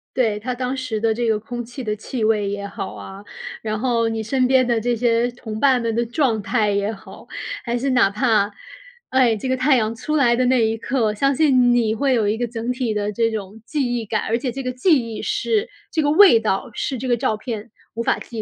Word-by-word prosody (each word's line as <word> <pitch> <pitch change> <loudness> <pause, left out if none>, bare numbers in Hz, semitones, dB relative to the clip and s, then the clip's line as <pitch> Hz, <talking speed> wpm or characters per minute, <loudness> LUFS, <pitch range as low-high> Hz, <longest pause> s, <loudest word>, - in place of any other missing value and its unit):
对， 220 -5 +1
它 250 +3 -4
当 255 +1 -2
时 250 -5 -3
的 225 -1 +2
这 235 +1 -1
个 220 -1 +2
空 240 +3 -6
气 245 +3 -8
的 215 -2 -1
气 220 +3 -5
味 215 -2 +2
也 200 0 -4
好 200 -1 -6
啊， 195 +1 -9 0.4
然 215 -1 -2
后 230 0 +1
你 225 -1 -2
身 255 +3 +1
边 260 0 +4
的 235 -2 +1
这 240 +2 0
些 235 +1 +1
同 220 -3 -7
伴 260 -2 +4
们 230 -1 -1
的 235 +1 0
状 235 -3 0
态 210 +1 +1
也 200 0 0
好， 195 - -13 0.4
还 235 0 -1
是 270 +3 -1
哪 245 -6 +4
怕 210 -1 +2 0.6
哎， 255 -3 +3
这 235 +5 -4
个 260 - +1
太 265 +2 +3
阳 220 -2 0
出 260 +7 -3
来 260 -5 +4
的 250 +1 +1
那 250 -2 +3
一 220 +1 -1
刻， 225 -2 0
相 275 +6 +1
信 255 -5 +4
你 225 -3 +2
会 270 +4 +1
有 220 -4 +2
一 215 - 0
个 240 +1 -1
整 230 +1 -3
体 250 -3 -2
的 210 0 -1
这 225 +2 +1
种 215 0 -6
记 275 -4 -1
忆 230 - -4
感， 215 0 -1
而 230 - +2
且 255 - -2
这 270 +1 -5
个 255 - -2
记 290 +6 +3 0.2
忆 - - -5
是 425 +1 0 0.2
这 315 - +1
个 290 - +1
味 345 - +7
道 215 0 -1
是 265 - -3
这 255 +2 -4
个 240 - +3
照 220 - 0
片 215 0 -6 0.2
无 230 - -3
法 - - +1
记 230 -2 -7
235 Hz, 260 characters per minute, -21 LUFS, 220-255 Hz, 0.6 s, 味